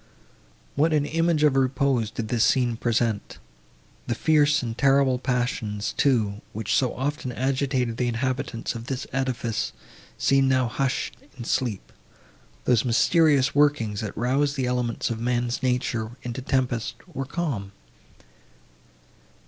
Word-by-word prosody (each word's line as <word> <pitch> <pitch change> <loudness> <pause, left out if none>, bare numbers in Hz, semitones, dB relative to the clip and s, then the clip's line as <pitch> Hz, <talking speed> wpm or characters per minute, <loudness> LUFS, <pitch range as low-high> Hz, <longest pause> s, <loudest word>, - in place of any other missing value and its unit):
What 155 +3 +2
an 150 -2 +2
image 165 0 +1
of 145 -3 +4
repose 130 -3 +1
did 110 -1 -5
this 115 -1 +2
scene 120 -3 +2
present! 115 -2 -1 0.7
The 120 - 0
fierce 150 0 +3
and 115 -2 -3
terrible 135 -1 +3
passions, 120 -5 -2
too, 110 -7 +1
which 110 -1 -2
so 130 -3 +1
often 140 0 -2
agitated 130 -2 -1
the 125 - 0
inhabitants 125 0 -2
of 115 0 -8
this 135 0 -3
edifice, 125 -4 -1 0.4
seemed 135 -1 +3
now 130 -2 +2
hushed 135 +2 -2 0.2
in 120 - -6
sleep;—those 115 0 -3
mysterious 140 +2 +3
workings, 140 -8 +2
that 105 -3 -5
rouse 135 +5 +1
the 135 -3 -1
elements 125 -2 -1
of 115 - -3
man's 120 +1 -1
nature 125 -3 -1
into 120 +1 -5
tempest—were 130 +3 -2
calm. 135 - -3
125 Hz, 125 wpm, -25 LUFS, 115-135 Hz, 0.7 s, of